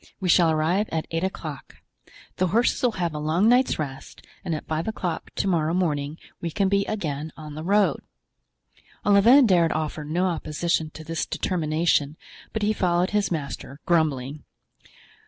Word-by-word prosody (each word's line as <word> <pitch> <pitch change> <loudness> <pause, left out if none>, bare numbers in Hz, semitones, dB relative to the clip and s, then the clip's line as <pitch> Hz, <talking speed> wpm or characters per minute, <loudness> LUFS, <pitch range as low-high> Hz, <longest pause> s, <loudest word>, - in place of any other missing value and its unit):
We 185 -3 -2
shall 170 -1 +5
arrive 160 +7 +1
at 160 -1 -1
eight 165 +1 -1
o'clock. 160 -7 -5 0.6
The 185 - +2
horses 225 +7 +2
will 245 -3 +2
have 175 -4 -2
a 150 - -4
long 160 +7 +2
night's 250 +2 +4
rest, 135 -4 -7 0.2
and 165 - -2
at 150 - -6
five 160 +3 -2
o'clock 180 -6 -3
to - - -1
morrow 165 -2 +1
morning 150 -4 -1 0.2
we 170 - -2
can 195 +4 0
be 200 0 +2
again 155 -7 -3
on 155 -1 -8
the 155 +1 -6
road." 200 +3 +2 1.0
Olivain 230 +7 +6
dared 175 -6 +4
offer 155 -1 -3
no 165 +5 0
opposition 160 -1 -1
to 160 - -8
this 165 +1 -3
determination 155 -3 0 0.3
but 220 - -3
he 215 +1 +2
followed 180 -2 +1
his 210 -1 +1
master, 140 -3 -5
grumbling. 150 -4 0
165 Hz, 165 wpm, -25 LUFS, 155-190 Hz, 1.0 s, Olivain